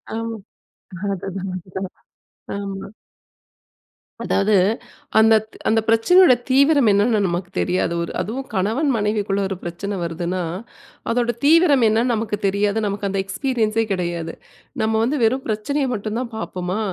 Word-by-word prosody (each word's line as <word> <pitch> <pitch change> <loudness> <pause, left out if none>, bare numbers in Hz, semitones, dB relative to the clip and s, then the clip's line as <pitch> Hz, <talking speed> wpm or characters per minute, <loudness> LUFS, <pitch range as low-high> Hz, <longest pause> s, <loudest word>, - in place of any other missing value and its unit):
ஆமா. 225 0 -4 0.8
அதுதான், 190 0 -5
அதுதான். 185 +1 -6 0.7
ஆமா. 195 -1 -6 1.4
அதாவது 205 +1 +2 0.6
அந்த 220 0 +6 0.3
அந்த 225 0 +3
பிரச்சனையோட 255 +7 +6 0.2
தீவிரம் 280 -2 +5
என்னன்னு 210 +2 +3
நமக்கு 175 +1 -3
தெரியாது. 180 -1 0
ஒரு 170 - -5
அதுவும் 260 +6 -4
கணவன், 220 +11 +1
மனைவிக்குள்ள 210 -2 0
ஒரு 195 - -3
பிரச்சன 195 +4 -4
வருதுன்னா, 175 +2 -3 0.7
அதோட 240 0 +1
தீவிரம் 300 -5 +5
என்னன்னு 230 +3 +2
நமக்கு 215 -1 -2
தெரியாது. 200 +2 +1
நமக்கு 200 0 -2
அந்த 195 0 -2
எக்ஸ்பீரியன்சே 225 -1 0
கிடையாது. 170 -3 -3 0.5
நம்ப 220 0 +1
வந்து 285 +4 0
வெறும் 260 +4 +1
பிரச்சனய 265 +6 -1
மட்டும் 215 +2 -3
தான் 245 -2 -4
பாப்பமா! 185 -2 -3
215 Hz, 125 wpm, -21 LUFS, 195-235 Hz, 1.4 s, அந்த